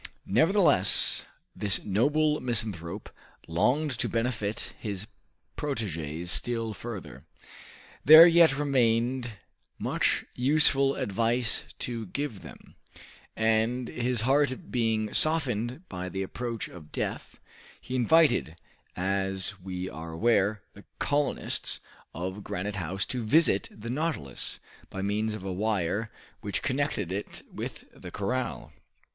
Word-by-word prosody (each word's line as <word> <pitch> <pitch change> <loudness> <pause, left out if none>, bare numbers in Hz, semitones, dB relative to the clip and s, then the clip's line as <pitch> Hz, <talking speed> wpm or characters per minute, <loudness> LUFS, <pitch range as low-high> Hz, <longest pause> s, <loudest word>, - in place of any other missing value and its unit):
Nevertheless, 150 - +4 0.3
this 100 -2 0
noble 150 +9 +2
misanthrope 105 -6 -3 0.4
longed 125 - +1
to - - 0
benefit 115 -3 -2
his 100 -2 -5 0.5
proteges 90 - -3
still 115 0 -2
further. 95 - -8 0.8
There 155 +4 +11
yet 170 -5 +6
remained 125 -3 +1 0.4
much - - 0
useful 140 +1 +3
advice 115 +3 0 0.2
to 115 -3 -5
give 130 -2 -4
them, - - -13 0.6
and, 110 +3 +1
his 120 -1 -1
heart 135 +1 +1
being 110 -3 0
softened 130 - +1
by 90 -1 -5
the 95 +1 -3
approach 115 +3 -4
of 80 -4 -13
death, - - -4 0.4
he 130 - -8
invited, 125 - +3 0.4
as 95 +1 -1
we 90 0 -5
are 80 -1 -7
aware, 105 +1 +2
the 100 - -14
colonists 145 -1 -1 0.3
of 95 +4 -5
Granite 100 +1 -4
House 95 +3 -2
to 125 0 -3
visit 110 -3 +3
the 115 +2 -7
"Nautilus," 140 - -3 0.3
by 95 - -5
means 105 +2 -1
of 110 - -8
a 95 -1 -3
wire 105 +1 -1 0.3
which 100 -2 -3
connected 130 - -1
it 100 +2 -5
with - - -6
the - - -9
corral. 125 +5 -3
110 Hz, 115 wpm, -28 LUFS, 95-130 Hz, 0.8 s, There